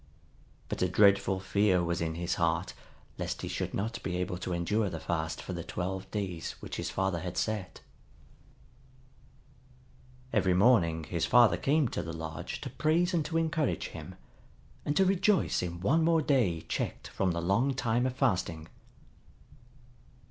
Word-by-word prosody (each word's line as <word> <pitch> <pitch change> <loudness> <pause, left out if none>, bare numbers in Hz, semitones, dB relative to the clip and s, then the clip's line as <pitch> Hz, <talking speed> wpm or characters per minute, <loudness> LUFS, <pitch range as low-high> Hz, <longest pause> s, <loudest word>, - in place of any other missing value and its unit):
But - - -4
a 90 - +2
dreadful 100 0 +4
fear 95 -1 +2
was 85 -1 -1
in 80 -1 -2
his 85 0 -1
heart 85 +2 +1 0.5
lest - - -3
he - - -3
should - - -3
not 115 +4 -3
be 90 -2 -3
able 90 0 -2
to 90 - -4
endure 95 +5 0
the 80 - -5
fast 80 -1 -2
for 95 - -5
the 85 -1 -4
twelve 95 +3 -4
days 90 -6 -3
which - - -8
his - - -3
father 95 -2 -1
had 90 +1 -5
set. 105 -4 -2 2.5
Every 95 -5 +3
morning 90 -7 +4
his 85 +2 -2
father 120 -1 +6
came 150 0 +2
to - - -3
the 80 0 -6
lodge 80 -1 -6
to - - -5
praise 170 +4 +1
and 165 -3 +2
to 165 - -1
encourage 160 -3 0
him, - - -9 0.7
and 145 - 0
to 195 - +5
rejoice 195 +1 +2
in 85 -1 -4
one 155 - +3
more 165 -1 +3
day 115 - +2
checked - - -4
from 95 - 0
the 85 - -2
long 115 +10 +1
time 120 0 +1
of 130 - -4
fasting. 90 - 0
95 Hz, 165 wpm, -30 LUFS, 85-125 Hz, 2.5 s, father